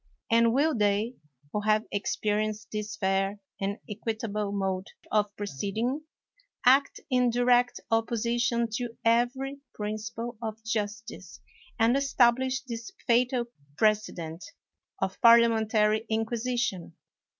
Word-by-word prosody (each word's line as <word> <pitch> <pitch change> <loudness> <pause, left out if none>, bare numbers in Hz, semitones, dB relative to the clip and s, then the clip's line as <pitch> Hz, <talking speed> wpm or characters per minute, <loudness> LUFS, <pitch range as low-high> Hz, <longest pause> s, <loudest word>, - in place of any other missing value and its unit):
And 230 0 +5
will 295 +6 +2
they, 210 +2 +1 0.4
who 210 - 0
have 215 +1 +2
experienced 215 +1 -1
this 210 0 -4
fair 195 0 0 0.2
and 200 +1 -2
equitable 215 -1 -3
mode 195 -1 -2 0.2
of 210 -1 +2
proceeding, 215 - -2 0.6
act 270 +3 +4
in 250 -1 +3
direct 245 +1 +3
opposition 235 +1 +1
to 240 -2 -5
every 250 +4 +1 0.2
principle 215 +2 -5
of 220 -1 -4
justice 220 0 -4 0.4
and 230 +2 +4
establish 260 -1 +2
this 230 -3 -6 0.2
fatal 245 0 +2 0.3
precedent 195 -6 0 0.6
of 190 - -3
parliamentary 225 -2 +5
inquisition? 225 -3 -1
225 Hz, 105 wpm, -28 LUFS, 210-240 Hz, 0.6 s, And